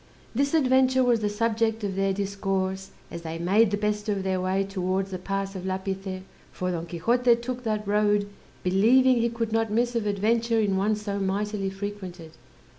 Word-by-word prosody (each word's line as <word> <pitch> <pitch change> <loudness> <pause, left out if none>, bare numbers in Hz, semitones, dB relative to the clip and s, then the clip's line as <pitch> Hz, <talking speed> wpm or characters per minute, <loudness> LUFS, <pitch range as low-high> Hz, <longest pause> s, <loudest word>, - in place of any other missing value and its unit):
This 280 +5 +1
adventure 260 -2 +4
was 240 -2 +3
the 210 -1 0
subject 225 +1 0
of 195 -2 -2
their 195 0 +1
discourse, 195 -1 -2 0.2
as 170 - -6
they 165 0 -5
made 195 +6 +3
the 205 - -1
best 210 +1 -1
of 200 -2 -1
their 190 -1 0
way 190 +1 +1
towards 190 0 -2
the 185 - -4
pass 195 +1 -3
of 185 - -5
Lapice, 190 0 -4 0.3
for 180 0 -3
Don 170 -1 -4
Quixote 235 +9 +2
took 245 +1 -5
that 215 -2 -1
road, 205 0 +2 0.4
believing 240 +8 +4
he 235 0 +2
could 230 -1 -3
not 225 -1 +1
miss 240 +3 +1
of 225 -3 0
adventure 225 +3 +1
in 205 -3 +1
one 205 +3 +2
so 205 -1 -4
mightily 200 +1 -1
frequented. 190 -4 -7
205 Hz, 185 wpm, -26 LUFS, 190-225 Hz, 0.4 s, adventure